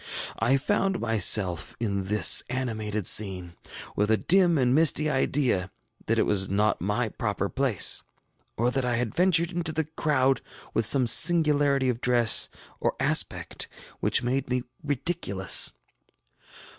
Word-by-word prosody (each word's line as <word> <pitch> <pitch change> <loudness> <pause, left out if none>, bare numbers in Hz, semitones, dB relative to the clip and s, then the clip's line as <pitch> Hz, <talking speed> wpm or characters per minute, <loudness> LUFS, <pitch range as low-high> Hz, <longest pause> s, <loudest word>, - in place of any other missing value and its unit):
I 135 +3 +2
found 195 +5 -1
myself 100 -6 +1
in 100 -4 -3
this 100 -4 +5
animated 110 -5 -4
scene, 90 -3 +2 0.4
with 105 +1 -1
a 110 - +2
dim 175 - +2
and 125 -2 +1
misty 155 0 +2
idea 130 -8 -1 0.4
that - - 0
it - - +1
was 95 -2 0
not 105 +2 -1
my 105 +5 -2
proper 100 -4 -4
place, 130 -8 0 0.6
or 120 +2 0
that 135 0 -2
I 125 -1 -1
had 115 -2 -3
ventured 175 -1 +2
into 175 -2 -3
the 160 +1 -2
crowd 140 -4 -1 0.3
with 115 -2 +1
some 130 +1 +3
singularity 145 -2 +3
of 125 -1 -3
dress 120 -3 +3 0.3
or - - -2
aspect - - -1 0.3
which - - -1
made 130 +2 -2
me 125 0 -2 0.2
ridiculous. 140 - +1
125 Hz, 140 wpm, -25 LUFS, 105-145 Hz, 0.6 s, this